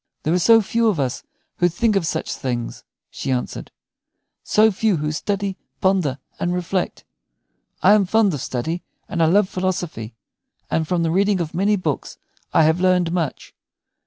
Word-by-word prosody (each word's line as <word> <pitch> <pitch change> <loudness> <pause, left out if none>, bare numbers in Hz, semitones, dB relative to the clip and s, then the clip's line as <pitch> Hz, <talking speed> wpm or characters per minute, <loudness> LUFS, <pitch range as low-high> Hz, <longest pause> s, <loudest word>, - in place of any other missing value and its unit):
"There 155 - +1
are 180 - +3
so 225 +4 +6
few 230 +3 +1
of 200 -8 +1
us 130 -3 -1 0.4
who 175 - +3
think 215 +5 +1
of 180 -5 +1
such 160 - -2
things," 120 -3 -4 0.3
she - - -5
answered, 125 -1 -3 0.7
"so 220 +1 +4
few 205 -1 +1
who 150 0 -2
study, 195 +4 -2 0.2
ponder, 185 -8 +1 0.2
and 175 +1 0
reflect. 180 +1 -2 0.8
I 195 - +7
am 210 -2 +4
fond 215 -2 +3
of 145 - -4
study, 140 +6 -3 0.3
and 175 -4 -2
I 160 - +5
love 195 +4 +4
philosophy; 175 - -3 0.6
and 160 -1 0
from 175 0 0
the 165 - +1
reading 195 +2 +2
of 165 -3 -3
many 200 +4 +2
books 160 -8 -3 0.3
I 160 - +4
have 160 +3 +2
learned 180 -2 +3
much. 170 -5 -3
180 Hz, 170 wpm, -21 LUFS, 160-195 Hz, 0.8 s, I